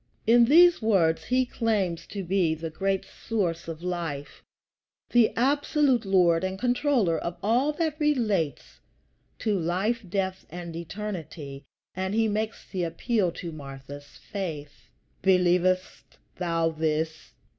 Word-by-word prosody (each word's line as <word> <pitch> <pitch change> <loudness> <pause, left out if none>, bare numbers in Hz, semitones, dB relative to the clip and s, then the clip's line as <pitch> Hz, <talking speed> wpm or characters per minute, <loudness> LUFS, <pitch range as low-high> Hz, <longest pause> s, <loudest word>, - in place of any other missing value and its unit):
In 235 +1 +6
these 340 +5 +6
words 180 -7 +2
he 255 +1 +2
claims 210 -9 -1
to 200 -2 -5
be 175 -3 +1
the 160 0 -6
great 195 +3 -1
source 175 -8 -3
of 165 0 -7
Life, 165 -6 -4 0.7
the 240 -3 +5
absolute 275 -1 +2
Lord 180 -3 +3
and 190 0 -2
Controller 245 - +1
of 170 +2 -4
all 245 +8 +2
that 315 -1 -2
relates 215 - 0 0.6
to 215 - 0
life, 190 +8 0
death, 190 0 -2
and 170 0 -7
eternity; 165 -6 -6 0.3
and 190 +2 -2
he 225 0 +3
makes 215 +1 -3
the 185 - -3
appeal 180 +3 0
to 170 - -6
Martha's 140 -1 -10
faith: 160 -8 -7 0.3
"Believest 185 0 +1 0.2
thou 165 -2 0
this?" 160 0 -2
185 Hz, 125 wpm, -27 LUFS, 165-225 Hz, 0.7 s, In